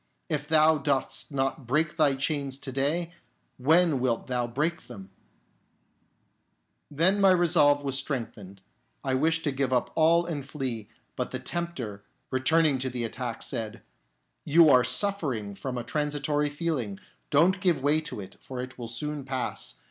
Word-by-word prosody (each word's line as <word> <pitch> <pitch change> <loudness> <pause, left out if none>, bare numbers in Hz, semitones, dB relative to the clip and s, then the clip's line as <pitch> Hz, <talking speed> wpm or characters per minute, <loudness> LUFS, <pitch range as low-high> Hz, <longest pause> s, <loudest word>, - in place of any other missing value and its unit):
If 150 -2 -2
thou 155 0 +5
dost 140 +1 -1
not 135 -1 -2
break 155 +5 +1
thy 145 -3 +3
chains 140 -1 -2
to 135 - -6
day, 155 +6 0 0.4
when 160 +2 +4
wilt 125 -2 0
thou 125 -1 -1
break 150 +8 -2
them? 100 -6 -11 0.9
" - - -43 0.7
Then 180 +7 +2
my 195 - +6
resolve 160 -5 +4
was 135 -1 -1
strengthened, 105 -9 -6 0.4
I 135 -2 -1
wished 160 +5 +1
to 145 - 0
give 135 -1 -1
up 125 -1 +1
all 165 +2 +4
and 155 -5 -4
flee; 130 -6 -5 0.3
but - - -2
the - - -4
Tempter, 130 -13 -5 0.3
returning 140 +2 +3
to 130 +1 -2
the 125 -1 -3
attack, 120 +1 -4
said, 110 -1 -5 0.3
" 60 - -48
You 165 -1 +8
are 125 -2 +6
suffering 135 - 0
from 125 +5 -5
a 120 - -3
transitory 150 +1 -1
feeling; 145 -10 -3 0.3
don't 180 +6 +3
give 170 -8 +1
way 150 +2 +3
to 155 - -6
it, 95 - -11
for 130 -1 -8
it 125 0 -7
will 120 - -5
soon 145 +5 -4
pass. 130 -1 -4
140 Hz, 165 wpm, -27 LUFS, 125-160 Hz, 0.9 s, You